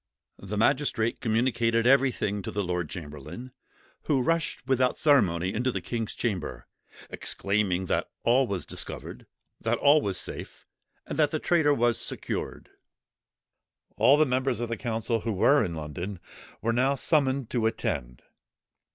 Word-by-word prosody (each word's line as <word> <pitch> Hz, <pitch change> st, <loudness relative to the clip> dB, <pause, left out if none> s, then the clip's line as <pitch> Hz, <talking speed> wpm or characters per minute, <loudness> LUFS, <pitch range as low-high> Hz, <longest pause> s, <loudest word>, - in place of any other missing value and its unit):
The 100 Hz, +2 st, -5 dB
magistrate 115 Hz, 0 st, +1 dB
communicated 115 Hz, 0 st, +1 dB
everything 125 Hz, -6 st, +2 dB
to -, -, -6 dB
the 100 Hz, -, -2 dB
lord 90 Hz, -3 st, -2 dB
chamberlain, 80 Hz, -, -8 dB, 0.5 s
who 135 Hz, -5 st, +2 dB
rushed 165 Hz, -2 st, -1 dB
without 130 Hz, -1 st, +2 dB
ceremony, 95 Hz, -, +3 dB
into 125 Hz, +3 st, 0 dB
the -, -, -2 dB
king's 115 Hz, -3 st, -4 dB
chamber, 100 Hz, -9 st, -3 dB, 0.5 s
exclaiming 100 Hz, -2 st, 0 dB
that -, -, -1 dB
all 125 Hz, +2 st, +3 dB
was 95 Hz, -6 st, -3 dB
discovered, -, -, -7 dB, 0.3 s
that -, -, 0 dB
all 145 Hz, +2 st, +5 dB
was 95 Hz, -6 st, -1 dB
safe, -, -, -6 dB, 0.4 s
and -, -, -5 dB
that 150 Hz, -2 st, +4 dB
the 155 Hz, -, -1 dB
traitor 160 Hz, -2 st, +2 dB
was 120 Hz, -1 st, +2 dB
secured. -, -, -4 dB, 1.2 s
All 140 Hz, -, +5 dB
the 155 Hz, -, +5 dB
members 130 Hz, -1 st, 0 dB
of 120 Hz, -1 st, -3 dB
the 115 Hz, -, -1 dB
council, 115 Hz, -1 st, -2 dB
who 115 Hz, 0 st, -2 dB
were 140 Hz, +9 st, +4 dB
in 85 Hz, -5 st, -3 dB
London, 85 Hz, +5 st, -5 dB, 0.4 s
were 115 Hz, +1 st, +1 dB
now 130 Hz, +4 st, +2 dB
summoned 135 Hz, -3 st, +1 dB
to 115 Hz, -3 st, +1 dB
attend. 60 Hz, -, -3 dB
115 Hz, 145 wpm, -27 LUFS, 100-130 Hz, 1.2 s, all